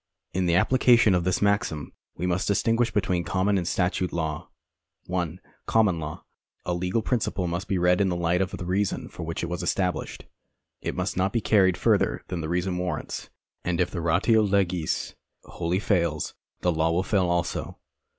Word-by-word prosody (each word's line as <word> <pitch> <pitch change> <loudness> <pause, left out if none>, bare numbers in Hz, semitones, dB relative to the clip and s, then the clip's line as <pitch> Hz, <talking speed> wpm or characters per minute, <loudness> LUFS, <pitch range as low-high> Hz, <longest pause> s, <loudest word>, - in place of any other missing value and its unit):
In 90 0 0
the 85 - +3
application 120 +1 +5
of 90 -2 +1
this 95 +2 +1
maxim 100 -7 0 0.2
wo 90 - -3
must 90 0 0
distinguish 115 +3 +2
between 95 -4 0
common 100 +3 +1
and 90 -3 0
statute 90 0 0
law. 80 -2 -3 0.6
(1) 90 -1 -2 0.3
Common 105 -7 +3
lain. 75 0 -5 0.5
A 90 - 0
legal 90 +5 -1
principle 105 -6 -1
must 85 +2 -3
be 95 - 0
read 90 +1 +3
in 95 - +2
the 90 - -1
light 85 +1 +1
of 95 - 0
the 90 - -6
reason 95 +3 -1
for - - -10
which 80 +1 -4
it - - +1
was 90 +2 -3
established. 90 -1 -2 0.6
It - - -3
must - - -2
not 95 +1 +1
be 115 - +1
carried 95 -5 +3
further - - +2
than 85 - -3
this 80 - -4
reason 90 +1 -1
warrants, 90 -4 -4 0.3
and 90 -1 -1
if 90 0 +1
the 85 - -3
ratio 90 +7 +3
legis 95 -5 0 0.3
wholly 85 +2 -2
fails, 85 -7 0 0.3
the 90 - +2
law 80 0 +1
will 85 +3 +1
fail 95 -2 +1
also. 85 -1 -2
90 Hz, 185 wpm, -26 LUFS, 85-100 Hz, 0.6 s, application